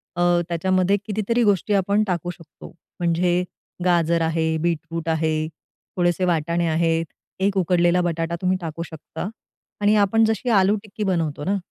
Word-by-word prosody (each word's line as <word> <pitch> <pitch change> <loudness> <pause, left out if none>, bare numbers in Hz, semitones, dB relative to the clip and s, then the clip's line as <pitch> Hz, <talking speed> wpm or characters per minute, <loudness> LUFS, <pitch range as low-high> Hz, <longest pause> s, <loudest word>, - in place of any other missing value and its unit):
अ, 175 - -1 0.3
त्याच्यामध्ये 185 +3 +2
कितीतरी 220 +3 0
गोष्टी 205 0 +2
आपण 200 +2 +2
टाकू 175 -1 -2
शकतो. 165 -4 -14 0.3
म्हणजे 175 +1 +1 0.4
गाजर 170 -1 +2
आहे, 160 0 0
बीटरूट 165 -1 -2
आहे, 155 -1 0 0.5
थोडेसे 175 +1 +2
वाटाणे 170 0 0
आहेत, 165 0 +1 0.3
1 195 +1 +1
उकडलेला 175 0 +3
बटाटा 170 -1 -1
तुम्ही 185 0 +1
टाकू 165 0 -5
शकता. 160 +3 -7 0.5
आणि 210 +1 +4
आपण 210 +2 +4
जशी 220 +3 -1
आलू 200 -1 +4
टिक्की 210 0 -6
बनवतो 165 -7 -1
ना. 200 +1 +1
175 Hz, 145 wpm, -22 LUFS, 165-195 Hz, 0.5 s, आणि